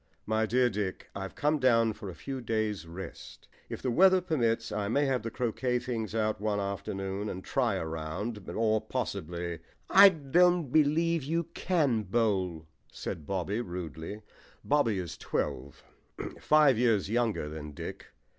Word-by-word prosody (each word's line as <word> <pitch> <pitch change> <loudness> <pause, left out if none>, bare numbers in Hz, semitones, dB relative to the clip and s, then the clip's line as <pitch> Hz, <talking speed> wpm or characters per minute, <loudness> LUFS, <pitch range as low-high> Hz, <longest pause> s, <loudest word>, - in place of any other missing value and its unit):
"My 110 +1 +1
dear 125 +3 +3
Dick, 100 -4 -4
I've 95 -1 -5
come 150 +1 +1
down 115 -4 +4
for 100 -2 -8
a 90 - -8
few 135 -1 -5
days' 110 -5 -2
rest. 85 +2 -9 0.2
If - - -6
the 130 - +1
weather 185 +7 +6
permits, 115 -10 0
I 105 -1 -1
may 140 +7 +2
have 130 -2 +1
the 115 - -4
croquet 125 +2 -1
things 115 -4 -3
out 110 -2 0
one 105 -1 0
afternoon 100 0 -3
and 95 0 -6
try 120 -6 +1
a 95 - -2
round, 80 +7 -5
or 110 -1 +1
possibly 85 +1 -4 0.2
" - - -39
"I 195 +2 +10
don't 170 -1 +2
believe 160 +3 +3
you 165 +4 0
can 145 -11 +1
bowl," 95 -6 0 0.3
said 75 -3 -6
Bobby 100 +4 -1
rudely. 90 - -6 0.4
Bobby 140 -8 +2
is 85 -2 -5
twelve 70 +3 -3 0.6
five 150 -6 +5
years 115 -6 +3
younger 115 -7 0
than 75 -1 -7
Dick. - - -7
110 Hz, 155 wpm, -30 LUFS, 95-130 Hz, 0.6 s, I